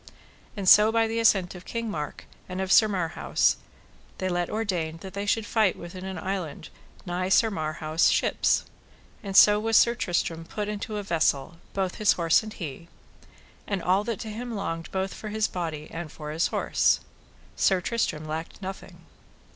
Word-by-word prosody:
And 195 -2 -3
so 210 +3 +8
by 225 0 +3
the 225 +1 -2
assent 195 -5 +3
of 180 -1 -10
King 230 +3 -4
Mark 150 -8 -5 0.2
and 185 +1 -4
of 190 0 -2
Sir 215 - +7
Marhaus 180 -5 +1 0.6
they 185 - -2
let 175 -1 -1
ordain 180 -7 -2
that 190 -1 -9
they 200 0 -4
should 220 +1 +1
fight 215 -4 +2
within 185 +2 -8
an 190 -1 -5
island 185 -6 -4 0.4
nigh 180 +1 -2
Sir 220 +3 +4
Marhaus' 155 -1 +1
ships; - - +2 0.6
and 195 -2 -1
so 210 0 +8
was 225 +1 +3
Sir 235 - +5
Tristram 170 -6 -1
put 205 +5 -4
into 210 0 -4
a 205 - -3
vessel 165 -3 0 0.2
both 190 -2 -1
his 215 - +4
horse 165 -2 +3
and 215 -1 -8
he, 165 -2 -7 0.8
and 195 -4 -2
all 190 +3 +2
that 230 -3 -3
to 220 - -6
him 235 +2 -5
longed 165 -5 -4
both 190 0 -2
for 215 - -7
his 215 0 0
body 160 -4 -4
and 165 -2 -6
for 150 -1 -7
his 160 +2 +1
horse. - - +2 0.5
Sir 190 -2 +3
Tristram 180 -6 -2
lacked 160 +2 -5
nothing. 190 -1 -8
190 Hz, 180 wpm, -26 LUFS, 165-210 Hz, 0.8 s, so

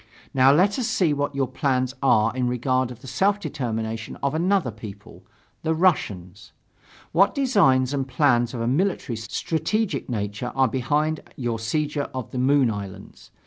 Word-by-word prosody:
Now 130 0 +6
let 195 - +3
us 240 - 0
see 170 -6 +2
what 145 0 -2
your 135 -1 0
plans 130 -2 0
are 115 -3 +3
in 125 -1 0
regard 130 +1 0
to 125 - -7
the 125 - -17
self 195 +11 +1
determination 115 - -4
of 140 0 +1
another 175 -4 +1
people 105 -2 -11 0.4
the 160 0 0
Russians; 100 - -1 0.6
what 195 +5 +3
designs 165 - +3
and 135 -2 -1
plans 125 -2 +2
of 115 - -3
a 115 - -1
military 150 -2 0
strategic 160 - -2
nature 105 +1 -3
are 135 -1 +4
behind 150 +5 0 0.2
your 120 -3 -2
seizure 150 +5 -2
of 130 -4 -5
the 125 - -3
Moon 130 -2 +3
Islands. 100 -3 -9
130 Hz, 160 wpm, -24 LUFS, 115-155 Hz, 0.6 s, Now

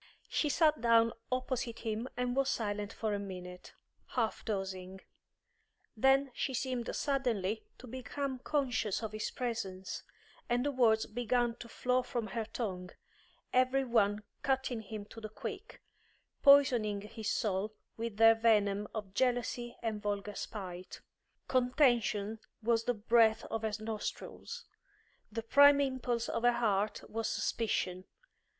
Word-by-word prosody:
She 300 - +1
sat 305 -4 +3
down 230 -1 +5 0.2
opposite 255 -2 -1
him 225 +2 -3
and 250 0 0
was 275 0 +2
silent 205 -2 -2
for 220 -2 -2
a 205 - -1
minute, 180 -2 -8 0.4
half 230 -4 0
dozing; 190 -2 -4 0.9
then 270 +3 +4
she 265 - -2
seemed 250 -2 -2
suddenly 230 -7 -1
to - - -11
become 260 +2 -4
conscious 245 -7 0
of 220 - -3
his 215 0 -3
presence, 210 -7 -4 0.5
and 245 +2 +1
the 290 - +1
words 230 -4 +3
began 240 +1 0
to 235 - -10
flow 250 +2 +1
from 240 -2 -3
her 230 -2 -2
tongue, 190 -5 -4 0.6
every 255 +2 +3
one 210 -3 +2 0.2
cutting 265 -3 0
him 215 -1 -7
to 225 +2 -11
the 215 - -6
quick, 420 - -7 0.6
poisoning 245 -8 +5
his 215 +1 -5
soul 210 -1 -1 0.2
with 230 -2 -4
their 225 0 +8
venom 210 -3 +2
of 205 -3 -5
jealousy 245 0 0
and 220 -2 -2
vulgar 205 0 -2
spite. 185 -3 -7 0.5
Contention 240 -5 +2 0.2
was 230 0 +2
the 245 - +1
breath 220 0 +4
of 225 - -1
her 220 -1 -2
nostrils; 225 - -5 0.7
the 225 +1 -3
prime 285 +4 +7
impulse 255 -4 0
of 230 - -2
her 245 0 +5
heart 215 -3 0
was 225 0 -2
suspicion. 185 -5 -1
230 Hz, 135 wpm, -33 LUFS, 210-250 Hz, 0.9 s, their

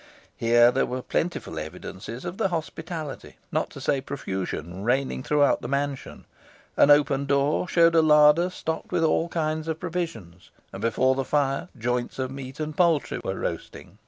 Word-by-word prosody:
Here 120 +1 +5
there - - +1
were 125 0 -4
plentiful 160 - -2
evidences 95 - -8
of 175 +2 -5
the 220 - +2
hospitality, 160 -3 -5
not - - 0
to - - -10
say 135 - 0
profusion, 95 - -5
reigning 130 +3 0
throughout 145 +1 +2
the - - -5
mansion. 140 0 -3 0.5
An - - +5
open 145 -1 +4
door 140 +5 +1
showed 170 -1 +4
a 165 - +6
larder 150 +2 +5
stocked 160 -3 -5
with 175 -2 +1
all 165 +1 +2
kinds 155 -1 -2
of 160 -1 -3
provisions, 160 - -5 0.2
and - - -7
before 130 +3 +2
the 135 0 -1
fire 135 0 0
joints 120 +1 -2
of 130 -1 -2
meat 135 0 -8
and 155 -1 -4
poultry 165 -4 +2
were - - -2
roasting. - - -6
140 Hz, 165 wpm, -25 LUFS, 125-160 Hz, 0.5 s, a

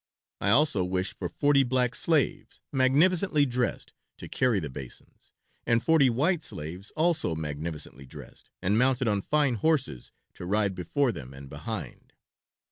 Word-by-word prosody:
I 100 - 0
also 120 -5 +3
wish 95 +1 -2
for 90 - -5
forty 145 -1 +3
black 125 -1 +1
slaves, 160 -1 0
magnificently 150 +4 +3
dressed, 125 -3 -2 0.2
to - - -9
carry 125 -5 +1
the 80 - -4
basins, 65 -2 -12 0.3
and 115 0 +1
forty 160 -5 +4
white 150 +8 +1
slaves, 90 - -7
also 160 - +1
magnificently 75 -3 -5
dressed - - -13
and 100 +4 +2
mounted 130 -1 +2
on 105 -2 +1
fine 145 +2 +1
horses, 140 - 0 0.2
to 90 - -8
ride 100 0 +1
before 120 - 0
them 65 - -9
and 70 0 -11
behind." - - -7
120 Hz, 145 wpm, -27 LUFS, 90-145 Hz, 0.3 s, forty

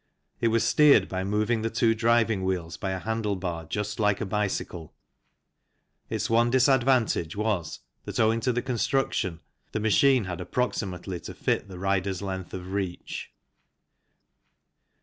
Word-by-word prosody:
It 115 - +2
was 115 0 +2
steered 145 -10 +5
by 95 0 -3
moving 105 +3 0
the 115 - -1
two 115 0 +2
driving 115 -3 +2
wheels 90 -3 -2
by 95 - -4
a 95 0 -2
handlebar 95 -7 -3
just 105 0 -3
like 105 -2 +2
a 115 - -2
bicycle. 95 -5 -3 1.1
Its - - -1
one 115 +1 +3
disadvantage 130 - +3
was 105 -6 -2 0.2
that - - -4
owing 110 +1 +3
to 125 +2 +1
the 120 0 -1
construction 125 - -1 0.3
the - - 0
machine 125 +4 +4
had 90 -1 -5
approximately 95 -4 -2
to - - -9
fit - - -1
the 95 -2 -9
rider's 95 0 -1
length 95 -2 -5
of 90 0 -7
reach. 95 -3 -4
105 Hz, 145 wpm, -27 LUFS, 95-115 Hz, 1.1 s, steered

